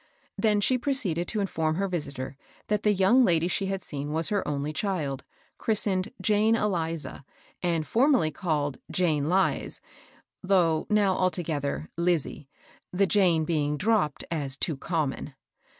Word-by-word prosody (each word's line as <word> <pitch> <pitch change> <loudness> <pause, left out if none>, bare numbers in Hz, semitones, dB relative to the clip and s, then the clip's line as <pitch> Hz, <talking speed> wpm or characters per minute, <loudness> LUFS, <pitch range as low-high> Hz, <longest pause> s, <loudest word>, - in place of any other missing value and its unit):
Then 210 -2 +2
she 255 +5 +2
proceeded 205 - 0
to 215 - -1
inform 160 -5 -1
her 195 +3 0
visitor 140 -7 -4 0.3
that 210 -1 +1
the 210 - +3
young 200 +6 +4
lady 170 -5 +3
she 195 +2 -1
had 195 -1 -3
seen 145 0 -5
was 160 +2 0
her 205 -2 +1
only 145 +1 -2
child, 155 -9 -2 0.4
chris 220 -2 0
tened 190 -1 -1
" - - -44
Jane 215 +1 +3
Eliza," 165 -9 -1 0.4
and 170 -3 0
formerly 235 - +3
called 150 -5 -2
" - - -11
Jane 155 -4 +1
Lize," 190 +2 0 0.6
though 175 -5 +2
now 205 -3 +3
altogether, 160 -6 -2
" - - -50
Lizie," 170 -5 -1 0.4
the 195 +2 +2
Jane 180 -5 +3
being 150 -2 0
dropped, 190 -7 +1
as 140 -5 -2
too 160 - -1
common. 145 -2 -3
175 Hz, 155 wpm, -27 LUFS, 155-200 Hz, 0.6 s, young